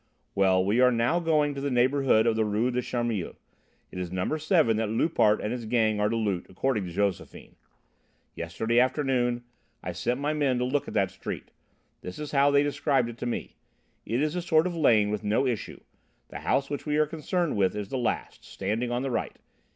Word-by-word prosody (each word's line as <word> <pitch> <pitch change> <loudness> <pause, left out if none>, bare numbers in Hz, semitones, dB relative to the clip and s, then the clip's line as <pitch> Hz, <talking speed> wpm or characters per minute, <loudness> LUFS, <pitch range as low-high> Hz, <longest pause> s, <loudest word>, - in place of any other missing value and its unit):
"Well, 95 -1 +3
we 105 +5 +2
are 125 0 +6
now 120 +8 +1
going 155 -3 +1
to 140 - -6
the 140 - -1
neighbourhood 130 -2 +3
of 115 -1 +2
the 110 - +2
Rue 110 +4 0
des 125 0 -1
Charmilles. 120 -7 -3 0.6
It 90 - -6
is 90 -2 -4
number 95 +12 -1
7 155 - +3
that 110 -1 -1
Loupart 110 -3 +2
and 105 - -3
his 120 -2 -4
gang 110 -2 +1
are 105 0 +2
to 115 - -1
loot, 105 -6 -1
according 105 +1 -1
to - - -7
Josephine. 100 +1 -3 0.8
Yesterday 110 +8 -1
afternoon 125 -2 +1 0.4
I 90 - -3
sent 120 +9 -2
my 145 +2 -1
men 140 -4 +1
to 125 - 0
look 140 +3 -1
at - - -7
the 100 -2 +3
street; 95 +1 -7 0.5
this 90 - -8
is 150 -1 -6
how 140 0 +4
they 140 0 +4
described 140 -4 +1
it 120 - -9
to - - -3
me. 120 - -4 0.5
It 120 +5 -1
is 155 +2 -1
a 180 - -1
sort 160 -1 +3
of 180 -1 -2
lane 110 -10 +3
with 105 0 -3
no 105 +6 +1
issue; 120 -5 -3 0.5
the - - -7
house 140 - 0
which 145 +1 -5
we 150 0 +1
are 155 - +4
concerned 165 +2 -2
with 100 -1 +1
is 105 -2 -4
the 130 - -2
last, 120 - -3
standing 110 +5 -3
on 120 +1 -1
the 135 - -2
right. 115 - -3
120 Hz, 215 wpm, -27 LUFS, 105-140 Hz, 0.8 s, are